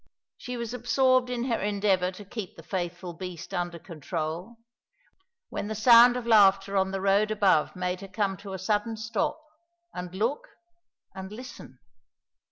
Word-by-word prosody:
She 250 Hz, 0 st, -6 dB
was 235 Hz, 0 st, -4 dB
absorbed 255 Hz, +1 st, +2 dB
in 245 Hz, -1 st, -2 dB
her 240 Hz, -3 st, 0 dB
endeavour 200 Hz, -3 st, +1 dB
to 205 Hz, +2 st, -11 dB
keep 200 Hz, -2 st, -7 dB
the 165 Hz, -, -12 dB
faithful 175 Hz, 0 st, -4 dB
beast 180 Hz, -1 st, -8 dB
under 175 Hz, -1 st, -2 dB
control, 165 Hz, -, -5 dB, 0.9 s
when -, -, -4 dB
the 220 Hz, -, -4 dB
sound 240 Hz, +2 st, +7 dB
of 245 Hz, -, -5 dB
laughter 200 Hz, -3 st, +5 dB
on 190 Hz, 0 st, +2 dB
the 195 Hz, 0 st, -3 dB
road 200 Hz, +2 st, +3 dB
above 200 Hz, -7 st, +2 dB
made 180 Hz, 0 st, -3 dB
her 195 Hz, -, -8 dB
come 195 Hz, 0 st, -1 dB
to 200 Hz, 0 st, -9 dB
a -, -, -3 dB
sudden 210 Hz, +4 st, -1 dB
stop, 220 Hz, +7 st, -2 dB, 0.5 s
and 180 Hz, 0 st, -6 dB
look, 230 Hz, +9 st, -1 dB, 0.7 s
and 190 Hz, +1 st, -8 dB
listen. 230 Hz, -, -10 dB
200 Hz, 160 wpm, -27 LUFS, 180-230 Hz, 0.9 s, sound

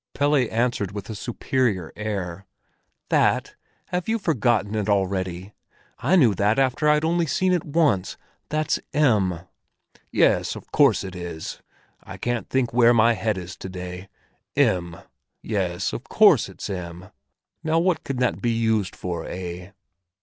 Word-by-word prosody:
Pelle 145 Hz, +1 st, +2 dB
answered 120 Hz, -5 st, 0 dB
with 105 Hz, +2 st, -6 dB
a -, -, -4 dB
superior 110 Hz, -4 st, -1 dB
air: 100 Hz, -4 st, -4 dB, 0.6 s
"That? -, -, +2 dB, 0.4 s
Have 180 Hz, +3 st, -2 dB
you 225 Hz, -, +2 dB
forgotten 120 Hz, -, +1 dB
it 105 Hz, -1 st, -1 dB
already? 95 Hz, -1 st, -1 dB, 0.5 s
I 185 Hz, -, +2 dB
knew 125 Hz, -, +5 dB
that 105 Hz, +4 st, +1 dB
after 135 Hz, +3 st, +2 dB
I'd 150 Hz, +1 st, +3 dB
only 170 Hz, 0 st, +1 dB
seen 185 Hz, +7 st, +1 dB
it 175 Hz, -, +1 dB
once! 145 Hz, -, +1 dB, 0.3 s
That's 155 Hz, 0 st, 0 dB, 0.2 s
M." 105 Hz, -, +2 dB, 0.7 s
"Yes, -, -, +2 dB
of -, -, -11 dB
course 130 Hz, -11 st, +4 dB
it 95 Hz, -1 st, -7 dB
is! 85 Hz, -3 st, -6 dB, 0.4 s
I -, -, -9 dB
can't 120 Hz, -1 st, -3 dB
think 125 Hz, -3 st, 0 dB
where 120 Hz, 0 st, +5 dB
my 115 Hz, +1 st, +5 dB
head 110 Hz, -2 st, -1 dB
is 90 Hz, 0 st, -7 dB
to 95 Hz, -, -7 dB
day. 90 Hz, 0 st, -7 dB, 0.5 s
M, 85 Hz, -2 st, +1 dB, 0.5 s
yes—of -, -, -2 dB
course -, -, +5 dB
it's -, -, -7 dB
M! 90 Hz, -1 st, -7 dB, 0.5 s
Now 160 Hz, +1 st, +1 dB
what 175 Hz, +1 st, +1 dB
can 135 Hz, -, -4 dB
that 125 Hz, -1 st, 0 dB
be 120 Hz, -1 st, +1 dB
used 110 Hz, -4 st, 0 dB
for, 90 Hz, -2 st, -5 dB
eh?" 90 Hz, 0 st, -6 dB
110 Hz, 150 wpm, -24 LUFS, 95-135 Hz, 0.7 s, knew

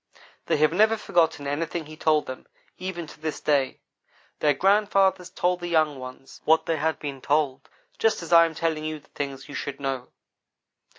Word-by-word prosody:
They -, -, +2 dB
have 155 Hz, +2 st, +3 dB
never 215 Hz, +4 st, +4 dB
forgotten 165 Hz, -7 st, +1 dB
anything 155 Hz, +3 st, -2 dB
he 155 Hz, +1 st, -10 dB
told 155 Hz, -1 st, +2 dB
them 130 Hz, -, -8 dB, 0.3 s
even 185 Hz, -2 st, -4 dB
to 150 Hz, -, -14 dB
this 155 Hz, -1 st, -3 dB
day. 140 Hz, -3 st, +1 dB, 0.6 s
Their 145 Hz, -2 st, +3 dB
grandfathers 195 Hz, 0 st, +3 dB
told 180 Hz, 0 st, 0 dB
the 175 Hz, -, -5 dB
young 155 Hz, -4 st, +2 dB
ones 130 Hz, +1 st, -10 dB
what 160 Hz, +1 st, +4 dB
they 165 Hz, -, 0 dB
had 160 Hz, +2 st, 0 dB
been 140 Hz, -3 st, -6 dB
told, 145 Hz, -2 st, 0 dB, 0.3 s
just 220 Hz, -5 st, +2 dB
as 170 Hz, -, -2 dB
I 165 Hz, 0 st, +9 dB
am 165 Hz, -1 st, -4 dB
telling 160 Hz, -1 st, -1 dB
you 155 Hz, 0 st, -3 dB
the 145 Hz, -, -26 dB
things 135 Hz, -1 st, -5 dB
you 145 Hz, -, -10 dB
should 140 Hz, 0 st, -5 dB
know. 135 Hz, -2 st, -3 dB
155 Hz, 185 wpm, -25 LUFS, 145-175 Hz, 0.6 s, I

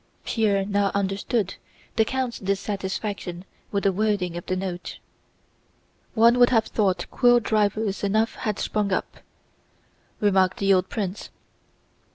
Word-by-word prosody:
Pierre 205 Hz, -4 st, +1 dB
now 200 Hz, 0 st, +1 dB
understood 200 Hz, +1 st, -1 dB, 0.4 s
the 225 Hz, -, +4 dB
count's 260 Hz, -1 st, -2 dB
dissatisfaction 195 Hz, -2 st, -3 dB, 0.3 s
with 200 Hz, -1 st, -1 dB
the 195 Hz, -, +3 dB
wording 195 Hz, -3 st, 0 dB
of 175 Hz, -, -5 dB
the 185 Hz, -, 0 dB
Note. 185 Hz, -1 st, -5 dB, 1.2 s
"One 235 Hz, +2 st, +5 dB
would 245 Hz, -, +7 dB
have 225 Hz, -3 st, +3 dB
thought 190 Hz, -5 st, 0 dB
quill 245 Hz, -1 st, +5 dB
drivers 210 Hz, -2 st, 0 dB
enough 215 Hz, +3 st, +1 dB
had 210 Hz, -2 st, -2 dB
sprung 210 Hz, -2 st, -1 dB
up," 185 Hz, -, -2 dB, 1.0 s
remarked 190 Hz, -3 st, +3 dB
the 195 Hz, 0 st, +3 dB
old 185 Hz, 0 st, +1 dB
prince. 200 Hz, -3 st, -4 dB
200 Hz, 130 wpm, -24 LUFS, 190-220 Hz, 1.2 s, would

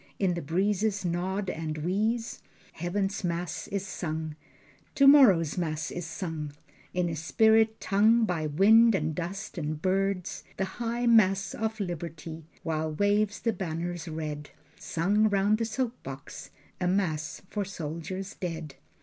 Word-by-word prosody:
In 190 Hz, -3 st, +1 dB
the 170 Hz, -, -3 dB
breezes 195 Hz, +5 st, 0 dB
nod 185 Hz, +3 st, -1 dB
and 160 Hz, -3 st, -3 dB
wheeze? 215 Hz, +8 st, -1 dB, 0.3 s
Heaven's 195 Hz, +4 st, -2 dB
mass 175 Hz, 0 st, -3 dB
is 195 Hz, -1 st, -3 dB
sung, 160 Hz, -4 st, -4 dB, 0.6 s
Tomorrow's 250 Hz, -, +6 dB
mass 155 Hz, -2 st, -2 dB
is 175 Hz, -1 st, -5 dB
sung 160 Hz, -3 st, -5 dB, 0.4 s
In 180 Hz, -1 st, 0 dB
a 165 Hz, -, -2 dB
spirit 220 Hz, +7 st, +3 dB
tongue 220 Hz, +3 st, +4 dB
By 165 Hz, -6 st, -1 dB
wind 220 Hz, +8 st, +6 dB
and 155 Hz, -3 st, -1 dB
dust 180 Hz, +4 st, -5 dB
and 150 Hz, -1 st, -3 dB
birds, 190 Hz, +1 st, -1 dB
The 190 Hz, -, 0 dB, 0.2 s
high 235 Hz, +1 st, -1 dB
mass 195 Hz, -5 st, +4 dB
of 220 Hz, 0 st, -3 dB
liberty, 165 Hz, -3 st, -5 dB, 0.2 s
While 155 Hz, -1 st, -1 dB
wave 205 Hz, +4 st, +1 dB
the 230 Hz, -, +2 dB
banners 175 Hz, -1 st, -4 dB
red: 155 Hz, -2 st, -5 dB, 0.3 s
Sung 205 Hz, +6 st, +2 dB
round 205 Hz, +2 st, +2 dB
the 230 Hz, -, +1 dB
soap 240 Hz, +2 st, -3 dB
box, 135 Hz, +1 st, -8 dB, 0.3 s
A 180 Hz, -, 0 dB
mass 160 Hz, -5 st, -1 dB
for 205 Hz, -, -1 dB
soldiers 180 Hz, +1 st, -5 dB
dead. 165 Hz, -5 st, -5 dB
180 Hz, 140 wpm, -28 LUFS, 160-205 Hz, 0.6 s, Tomorrow's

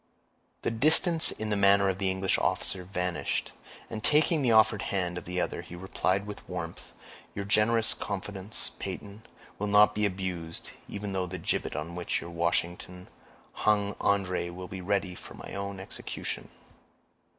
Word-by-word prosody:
The -, -, 0 dB
distance 160 Hz, +7 st, +7 dB
in 110 Hz, 0 st, -3 dB
the -, -, +2 dB
manner 100 Hz, 0 st, +5 dB
of 95 Hz, -1 st, -1 dB
the 95 Hz, -1 st, +1 dB
English 95 Hz, 0 st, +1 dB
officer 90 Hz, -, 0 dB
vanished, 90 Hz, -1 st, -2 dB, 0.3 s
and 110 Hz, -, -6 dB
taking 155 Hz, +1 st, +5 dB
the 125 Hz, -3 st, +2 dB
offered 110 Hz, -2 st, +5 dB
hand 90 Hz, -3 st, -1 dB
of 90 Hz, -, -6 dB
the 90 Hz, +1 st, -3 dB
other, 85 Hz, -, -2 dB
he 85 Hz, 0 st, -10 dB
replied 95 Hz, +2 st, -1 dB
with 105 Hz, 0 st, -9 dB
warmth, 85 Hz, -2 st, -6 dB, 0.4 s
"Your 100 Hz, -, -3 dB
generous 110 Hz, +2 st, +3 dB
confidence, 100 Hz, +1 st, -4 dB
Peyton, 100 Hz, +1 st, -6 dB, 0.4 s
will 105 Hz, -, -1 dB
not 105 Hz, +1 st, +6 dB
be 105 Hz, 0 st, +1 dB
abused, 90 Hz, -4 st, -4 dB, 0.2 s
even 100 Hz, -1 st, -5 dB
though 95 Hz, -1 st, -1 dB
the 90 Hz, +1 st, -5 dB
gibbet 85 Hz, -, -2 dB
on 75 Hz, +4 st, -4 dB
which 90 Hz, 0 st, -2 dB
your 85 Hz, -, -8 dB
Washington 85 Hz, +1 st, -2 dB, 0.4 s
hung 105 Hz, -1 st, +1 dB
André 90 Hz, -2 st, -1 dB
be 95 Hz, 0 st, -5 dB
ready 95 Hz, 0 st, -1 dB
for -, -, -11 dB
my -, -, -9 dB
own 100 Hz, 0 st, -4 dB
execution." 95 Hz, -, -5 dB
95 Hz, 160 wpm, -29 LUFS, 90-105 Hz, 0.4 s, distance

